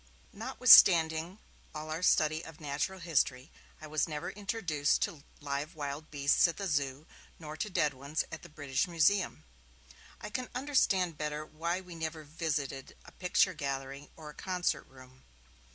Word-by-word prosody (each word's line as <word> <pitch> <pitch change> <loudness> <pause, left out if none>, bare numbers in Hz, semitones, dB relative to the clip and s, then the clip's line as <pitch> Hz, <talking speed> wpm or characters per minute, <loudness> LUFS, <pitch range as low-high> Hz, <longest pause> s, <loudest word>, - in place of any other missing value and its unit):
Notwithstanding 170 -6 +6 0.4
all 155 +1 -6
our 160 +2 -3
study 155 -2 +3
of 160 -2 -11
natural 150 +5 -3
history, 145 -5 0 0.3
I 155 - -9
was 155 +1 0
never 150 -2 -4
introduced 195 -8 0
to 145 -4 -4 0.2
live 145 +2 -4
wild 145 +1 -5
beasts 140 +3 +3
at 170 - -5
the 200 - -3
Zoo, 145 -3 -1 0.3
nor 155 -2 -8
to 210 - -3
dead 150 -6 +1
ones 140 +4 -3
at - - -7
the 170 - -12
British 145 -2 -2
Museum. 180 +3 +1 0.8
I - - -8
can 255 +2 -4
understand 200 - +1
better 150 0 -3
why 170 +4 -3
we 180 -2 -11
never 160 -1 -5
visited 145 -3 -4
a - - -13
picture 185 +1 +2
gallery 140 -1 -5
or 155 -2 -10
a - - -17
concert 180 +1 -2
room. 130 0 -17
155 Hz, 155 wpm, -31 LUFS, 145-175 Hz, 0.8 s, Notwithstanding